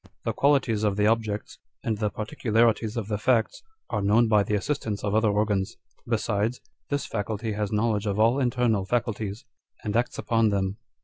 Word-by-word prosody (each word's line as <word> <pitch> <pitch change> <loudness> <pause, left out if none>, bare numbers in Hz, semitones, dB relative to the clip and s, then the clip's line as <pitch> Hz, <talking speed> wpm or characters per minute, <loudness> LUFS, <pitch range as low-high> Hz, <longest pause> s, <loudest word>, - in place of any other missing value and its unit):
The - - 0
qualities 135 -7 +2
of 105 -2 +1
the 105 - +3
objects, 110 -1 -1 0.2
and 110 -2 -1
the 105 -1 +1
particularities 110 0 0
of 110 -4 -3
the 105 -2 -2
facts, 115 -1 +1 0.3
are - - 0
known 110 +4 +4
by 105 -2 +4
the 105 +1 0
assistance 105 -2 -2
of 105 -1 -1
other 110 0 +3
organs. 100 -2 0 0.3
Besides, 115 0 0 0.3
this 145 -2 -1
faculty 110 +1 -3
has 105 -1 -2
knowledge 105 -1 +1
of 100 0 -1
all 115 +5 +4
internal 120 -5 +1
faculties, 110 -1 -2 0.4
and 105 0 -2
acts 120 +1 0
upon 115 -2 +2
them. 100 0 -1
110 Hz, 175 wpm, -26 LUFS, 105-115 Hz, 0.4 s, known